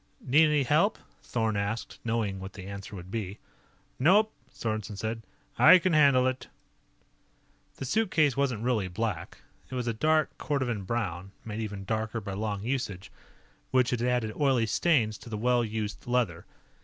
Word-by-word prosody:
"Need 150 +5 +4
any 150 -2 +2
help?" 155 - +3 0.2
Thorn 110 -3 -1
asked, 100 +3 -3
knowing 115 -4 -1
what 95 +1 -8
the 95 -3 -9
answer 100 +1 -7
would 90 0 -9
be. 100 -3 -4 0.6
"Nope," 205 +10 +4 0.2
Sorensen 110 -2 -4
said. 110 +2 -3 0.4
"I 185 - +9
can 180 0 0
handle 140 -4 +5
it." 130 0 -2 1.3
The 135 - -6
suitcase 155 - +2
wasn't 130 -6 0
really 115 -6 +1
black. 100 -1 -4 0.3
It 130 - -6
was 125 -1 -2
a 115 - 0
dark 155 +6 +2
cordovan 125 -9 -1
brown, 95 -5 -3
made 110 -1 -5
even 105 -3 -5
darker 110 +2 -2
by 100 -2 -6
long 105 0 -3
usage, 105 -7 -3 0.6
which 125 -2 +3
had 125 -2 -1
added 120 -3 0
oily 135 -5 +2
stains 110 -4 +2
to - - -11
the 110 - -3
well 120 +2 +2
used 110 -1 -4
leather. 115 -9 0
115 Hz, 160 wpm, -28 LUFS, 105-130 Hz, 1.3 s, I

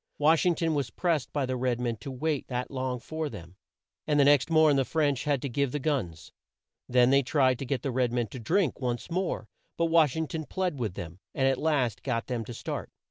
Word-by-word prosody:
Wash 160 +4 +4
ing 175 - +3
ton 165 0 0
was 140 -5 -1
pressed 160 +2 -1
by 145 -2 0
the 130 0 -2
red 125 -1 0
men 120 -2 -1
to 110 +7 -8
wait 145 +2 -2
that 125 0 -3
long 130 -2 -2
for 155 +5 -4
them, 90 -6 -10 0.5
and 150 -1 +2
the 140 - +6
next 145 +1 +4
morn 155 -2 +5
the 135 - +3
French 145 -2 0
had 145 -3 0
to - - -1
give 140 +1 0
the 150 - -1
guns. 130 - -2 0.6
Then 125 0 +5
they 140 0 +5
tried 130 -2 +2
to 135 - -5
get 130 -2 -2
the 135 - -1
red 125 -1 +1
men 120 -1 0
to 130 - -8
drink 165 - 0
once 125 +6 -3
more, 185 +2 -2 0.3
but 170 - +2
Wash 160 -5 +4
ing 160 0 0
ton 155 0 -5
plead 180 -6 -2
with 110 -7 -2
them, 85 +2 -7 0.2
and 135 - +2
at 135 -1 +1
last 140 -9 +1
got 120 -3 -2
them 120 -3 -3
to 120 - -7
start. - - -5
135 Hz, 240 wpm, -28 LUFS, 125-155 Hz, 0.6 s, the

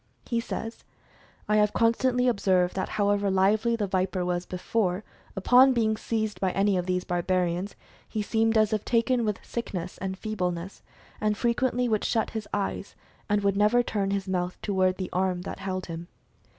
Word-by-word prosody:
He 235 - 0
says, 225 0 -5 0.6
"I 210 - +3
have 210 0 +3
constantly 250 +2 +2
ob 235 -5 +1
served 185 -2 +2
that 190 - -2
however 205 -1 +1
lively 210 +5 +3
the 215 -3 -1
viper 185 -1 -1
was 180 0 -2
before, 185 +1 -1 0.3
upon 250 +7 +6
being 220 -3 +2
seized 220 -1 -3
by 190 - +2
any 200 0 +2
of 180 0 -1
these 180 0 0
barbarians, 180 +1 -1 0.3
he 215 -2 -2
seemed 225 +1 +2
as 215 0 +3
if 215 - 0
taken 240 +1 +2
with 210 -2 -3
sickness 185 -7 -5
and 190 0 -4
feebleness, 185 -4 -3 0.4
and 210 -1 +1
frequently 245 +1 +1
would 215 -3 0
shut 225 -2 0
his 220 -2 -5
eyes, 200 0 -3 0.3
and 205 0 +2
would 200 -1 +2
never 210 +4 +4
turn 200 -4 -1
his 195 -1 -2
mouth 180 -1 -2
toward 185 -2 +1
the 185 -2 -4
arm 185 -1 0
that - - -6
held 185 -1 -3
him." 170 0 -7
200 Hz, 175 wpm, -27 LUFS, 185-225 Hz, 0.6 s, upon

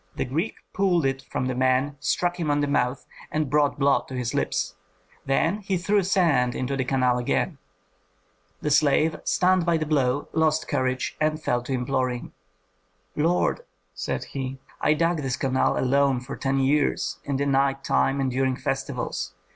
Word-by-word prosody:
The - - -1
Greek 145 +7 -2 0.2
pulled 180 -6 +2
it 135 0 0
from 130 - -2
the 130 - -1
man, 130 +3 +1
struck 175 +3 0
him 160 -3 -1
on 145 0 +2
the - - +2
mouth, 125 -2 0 0.3
and 155 -3 -1
brought 150 -1 +2
blood 140 0 +2
to 130 - -7
his 125 -1 -2
lips; - - -1 0.5
then 165 +8 +1
he 195 -2 -1
threw 200 +4 +2
sand 160 -10 +2
into 130 +2 -2
the 135 - 0
canal 125 -1 +1
again. 140 +5 -1 1.0
The 150 - 0
slave, 150 +2 +3
stunned 185 0 +3
by 170 -1 +2
the 155 - -2
blow, 140 -2 +1
lost 160 0 +1
courage 130 0 -1
and 155 0 +1
fell 125 -5 0
to 130 +2 -4
imploring. 125 -1 -2 0.8
"Lord," 170 - +1 0.3
said - - -3
he, 135 -1 -5 0.2
"I 150 - +3
dug 170 +2 +1
this 135 -2 -2
canal 130 -1 +1
alone 135 0 +2
for 125 - -7
ten 135 0 -1
years, 135 -9 +1
in 140 -2 -2
the 140 - 0
night 135 0 +1
time 100 - +1
and 135 -1 0
during 130 0 +1
festivals! 135 -1 -3
140 Hz, 170 wpm, -25 LUFS, 130-155 Hz, 1.0 s, slave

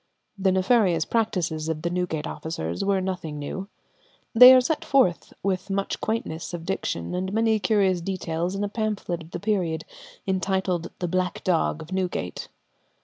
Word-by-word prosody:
The 195 -1 +2
nefarious 185 -3 +3
practices 175 -8 -1
of 155 -1 -3
the 170 - -1
Newgate 175 -4 -2
officers 85 - -4
were 195 -1 +2
nothing 180 -5 -4
new. 190 +7 -5 0.7
They 250 +2 +11
are - - +8
set 290 +5 -1
forth 260 -12 +2
with 190 0 -1
much 195 0 -2
quaintness 175 -7 -3
of 165 -1 -8
diction 85 - -3
and 185 +1 -2
many 220 0 +2
curious 190 -3 +2
details 175 -1 -2
in 200 - -2
a - - 0
pamphlet 205 -5 -2
of 160 - -12
the - - -5
period, 180 -7 -1 0.4
entitled 190 -2 0
the 180 - -2
"Black 185 +1 -1
Dogge 165 -3 +1
of 160 - -14
Newgate." 180 - -3
185 Hz, 160 wpm, -25 LUFS, 165-200 Hz, 0.7 s, They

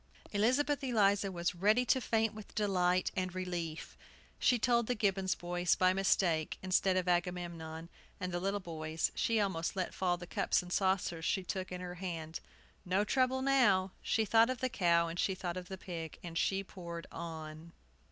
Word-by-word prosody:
Elizabeth 275 +7 +2
Eliza 205 -5 +2
was 170 -1 -1
ready 210 +7 +3
to 260 +2 +3
faint 225 -2 +1
with 215 -1 -11
delight 185 -3 +2
and 185 -1 -2
relief. 175 -3 -4 0.4
She 245 - +4
told 235 0 +2
the 250 - 0
Gibbons 195 -3 +1
boys, 175 0 0
by 185 0 +3
mistake, 180 -4 +1
instead 185 0 +2
of 185 -1 0
Agamemnon, 170 -2 -2 0.3
and 180 - -3
the 175 - -1
little 195 +3 -1
boys. 160 -3 -2
She 230 -1 +1
almost 190 -5 -1
let 185 -1 -2
fall 180 -2 0
the 175 - -8
cups 175 - +1
and 180 0 -6
saucers 190 -4 +1
she 190 +3 0
took 185 0 -4
in 180 0 -5
her 180 -1 -5
hand. 165 -3 -4 0.4
"No 190 +2 +1
trouble 260 +3 +1
now!" 210 -9 +4
She 220 - +1
thought 225 +2 +5
of 255 -2 -2
the 255 - 0
cow, 170 -7 +3
and 165 +1 -5
she 190 - +1
thought 175 -2 -4
of 180 -1 -6
the 190 - -5
pig, 165 -4 -6
and 170 -2 -7
she 195 +3 +1
poured 170 -3 -8
on. 160 0 -7
185 Hz, 180 wpm, -33 LUFS, 175-205 Hz, 0.4 s, thought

